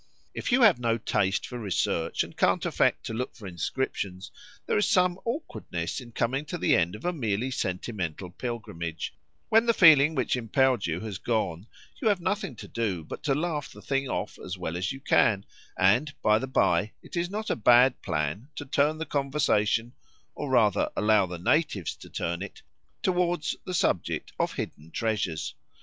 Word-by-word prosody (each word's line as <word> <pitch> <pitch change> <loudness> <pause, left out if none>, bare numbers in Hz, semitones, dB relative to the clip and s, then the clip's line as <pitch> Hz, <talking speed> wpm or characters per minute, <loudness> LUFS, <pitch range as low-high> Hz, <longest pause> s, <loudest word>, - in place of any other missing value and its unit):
If - - -3
you 250 +1 +5
have 200 - +6
no 115 -1 +1
taste 100 -3 0
for 125 - -6
research, 85 -5 0
and - - -11
can't - - +2
affect - - +1
to - - -4
look 125 +3 -3
for 110 - -12
inscriptions, 95 +1 -3 0.3
there - - 0
is - - +2
some 180 0 +3
awkwardness 135 - -4
in 120 -1 -12
coming 125 +5 0
to 175 - -4
the - - +3
end 85 +3 +1
of 110 - -10
a 180 - +1
merely 120 - -1
sentimental 90 -5 -3
pilgrimage; 85 -8 -5 0.4
when 225 +2 +4
the 230 - +4
feeling 155 -3 +7
which 130 - +1
impelled 125 -1 +2
you 85 +1 -2
has 105 -4 -5
gone, 100 -5 -1 0.3
you 235 - +1
have 205 -3 +3
nothing 185 - -2
to - - -9
do 100 -8 -2
but - - -8
to 135 - +1
laugh 150 -2 -2
the - - -12
thing 135 -1 -1
off - - -3
as 90 +1 -6
well 85 -2 -4
as 90 +2 -1
you 135 - -6
can, 100 -6 +3 0.3
and, 120 +11 +3
by 105 0 +4
the 130 - -4
bye, 105 -5 +2
it - - -10
is 175 0 0
not 215 +2 -3
a - - +1
bad 125 +3 +5
plan 80 - -2
to 145 - -6
turn 145 +3 +2
the 160 - -3
conversation 130 -6 +1 0.4
(or 145 - -5
rather, 115 -6 +3
allow 105 -2 +3
the 90 0 -6
natives 100 - +1
to - - -13
turn 85 +1 -3
it) 100 - -8 0.4
towards 175 -3 +1
the 185 - -3
subject 90 - 0
of - - 0
hidden 75 +2 -6
treasures. 95 -7 -2
115 Hz, 185 wpm, -27 LUFS, 95-145 Hz, 0.4 s, feeling